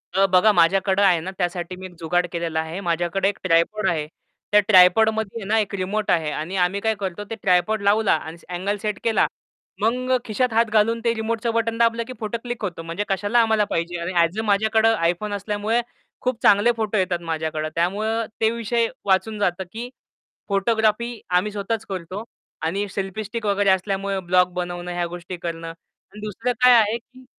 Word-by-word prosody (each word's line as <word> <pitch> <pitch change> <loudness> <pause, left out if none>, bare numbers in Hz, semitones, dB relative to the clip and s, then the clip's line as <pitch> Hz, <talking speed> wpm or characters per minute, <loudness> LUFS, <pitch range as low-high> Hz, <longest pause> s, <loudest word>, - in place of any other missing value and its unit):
अ, 195 +1 +5
बघा 185 +4 +6
माझ्याकडे 190 +3 +3
आहे 185 -4 +4
ना 185 +4 -5
त्यासाठी 175 0 -2
मी 185 +1 -9
एक 185 - -10
जुगाड 175 +2 +1
केलेला 170 -2 -2
आहे. 160 +3 -4
माझ्याकडे 175 +2 0
एक 200 - -5
ट्रायपॉड 185 +4 +2
आहे. 155 -3 -1 0.4
त्या 210 - +7
ट्रायपॉडमध्ये 220 +3 +4
आहे 200 - -7
ना, 220 - +3
एक 210 -2 -2
रिमोट 200 +3 -2
आहे 155 -3 +1
आणि 160 +6 -4
आम्ही 190 +3 -2
काय 220 0 +1
करतो 195 -1 -5
ते 225 - -4
ट्रायपॉड 185 +3 +2
लावला 205 +1 +3
आणि 160 +1 -4 0.2
आंगले 195 +4 -2
सेट 210 -1 -3
केला. 225 -2 +3 0.6
मग 255 +3 +1
खिशात 235 +2 0
हात 230 +1 +4
घालून 225 +2 +3
ते 230 - +3
रिमोटचं 225 +1 -2
बटन 230 0 0
दाबलं 230 0 +2
की 255 - -6
फोटो 220 +1 -3
क्लिक 240 -1 -5
होतो 175 -4 -4
म्हणजे 165 +5 -3
कशाला 205 +4 +1
आम्हाला 220 -2 +2
पाहिजे 170 +1 -2
आणि 170 +2 -3
ॲझ 170 +2 +2
अ - - +1
माझ्याकडे 220 +2 +3 0.2
iPhone 205 +4 -3
असल्यामुळे 210 +4 -1 0.4
खूप 250 -2 -2
चांगले 205 +4 +5
फोटो 220 -1 -1
येतात 185 -2 0
माझ्याकडं. 155 -1 -2
त्यामुळं 215 +7 0 0.2
ते 220 - +4
विषय 235 0 0 0.2
वाचून 205 +2 +1
जातं 190 -2 0
की 235 +2 -6 0.6
फोटोग्राफी 220 +3 +1 0.2
आम्ही 210 +4 0
स्वतःच 210 +2 -3
करतो. 190 +2 -5 0.4
आणि 195 +6 -1
सेल्फी 195 +2 -4
स्टिक 215 +2 -5
वगैरे 200 -1 +2
असल्यामुळे 195 +1 0
ब्लॉग 180 0 +2
बनवणं 175 0 -4
ह्या 175 0 -1
गोष्टी 175 +1 -7
करणं. 165 -1 -5
आणि 175 +4 -16
दुसरं 230 +4 -2
काय 250 0 +8
आहे, 220 0 +3
की 255 +2 -19
200 Hz, 185 wpm, -22 LUFS, 175-220 Hz, 0.6 s, काय